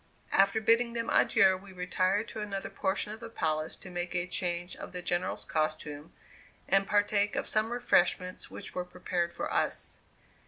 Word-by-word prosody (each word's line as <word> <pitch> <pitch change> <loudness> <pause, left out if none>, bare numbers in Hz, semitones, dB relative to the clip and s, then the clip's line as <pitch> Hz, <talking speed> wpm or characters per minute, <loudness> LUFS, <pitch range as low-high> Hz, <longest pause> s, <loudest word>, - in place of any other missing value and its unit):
After 195 +3 +4
bidding 230 +2 +3
them 230 -1 -2
adieu, 190 -1 +5
we 195 +1 -13
retired 185 +4 0
to - - -6
another 200 -2 -4
portion 210 +2 -1
of 220 - -9
the 230 0 -8
palace 155 -7 -1
to 185 - -11
make 175 0 -3
a 175 0 +1
change 175 0 -2
of - - -9
the 180 - -4
General's 175 +1 -1
costume, 155 -1 -2 0.6
and 195 +1 +4
to - - -17
partake 205 0 +2
of - - -1
some 215 +1 +1
refreshments 185 -6 +1
which - - -8
were 180 - -2
prepared 180 -1 -2
for - - -4
us. - - -1
185 Hz, 180 wpm, -30 LUFS, 175-210 Hz, 0.6 s, adieu